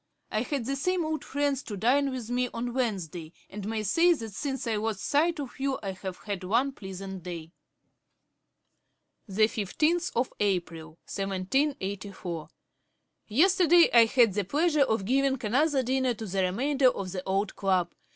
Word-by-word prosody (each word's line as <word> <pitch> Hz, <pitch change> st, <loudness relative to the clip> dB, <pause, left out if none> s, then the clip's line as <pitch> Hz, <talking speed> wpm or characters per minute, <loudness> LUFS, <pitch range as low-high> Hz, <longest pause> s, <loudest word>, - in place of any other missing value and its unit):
I 215 Hz, -, 0 dB
had 260 Hz, -1 st, -2 dB
the 275 Hz, +2 st, -1 dB
same 360 Hz, +4 st, 0 dB
old 310 Hz, 0 st, -2 dB
friends 285 Hz, -1 st, -1 dB
to 210 Hz, -6 st, -7 dB
dine 275 Hz, +7 st, +3 dB
with 250 Hz, -3 st, -5 dB
me 250 Hz, 0 st, 0 dB
on 240 Hz, +1 st, -3 dB
Wednesday, 180 Hz, -, -3 dB, 0.2 s
and 205 Hz, 0 st, -6 dB
may 220 Hz, -1 st, -2 dB
say 335 Hz, -, +4 dB
that 225 Hz, -9 st, -7 dB
since 270 Hz, +4 st, -3 dB
I 225 Hz, -2 st, 0 dB
lost 215 Hz, -2 st, -2 dB
sight 315 Hz, +3 st, +1 dB
of 270 Hz, -3 st, -7 dB
you 275 Hz, 0 st, 0 dB
I 195 Hz, -, -2 dB
have 190 Hz, -1 st, -7 dB
had 200 Hz, -3 st, -4 dB
one 235 Hz, +9 st, +1 dB
pleasant 190 Hz, -4 st, -8 dB
day.' 170 Hz, -2 st, -7 dB, 1.8 s
Ib. 195 Hz, -1 st, -8 dB
p. 220 Hz, -1 st, -3 dB
346. 330 Hz, -, +1 dB, 0.3 s
'April 170 Hz, -5 st, -2 dB
15, 195 Hz, 0 st, -3 dB
1784. 195 Hz, -, -2 dB, 0.8 s
Yesterday 345 Hz, -, +5 dB
I 235 Hz, -1 st, +8 dB
had 230 Hz, -3 st, +4 dB
the 205 Hz, +1 st, 0 dB
pleasure 300 Hz, -, +1 dB
of 220 Hz, -7 st, +2 dB
giving 270 Hz, +3 st, +2 dB
another 275 Hz, +5 st, +2 dB
dinner 260 Hz, 0 st, +1 dB
to 220 Hz, -, -6 dB
the 195 Hz, -1 st, -1 dB
remainder 260 Hz, +9 st, +2 dB
of 195 Hz, -6 st, -4 dB
the 185 Hz, -1 st, -4 dB
old 195 Hz, +1 st, -1 dB
club. 185 Hz, -3 st, +1 dB
225 Hz, 165 wpm, -28 LUFS, 195-275 Hz, 1.8 s, I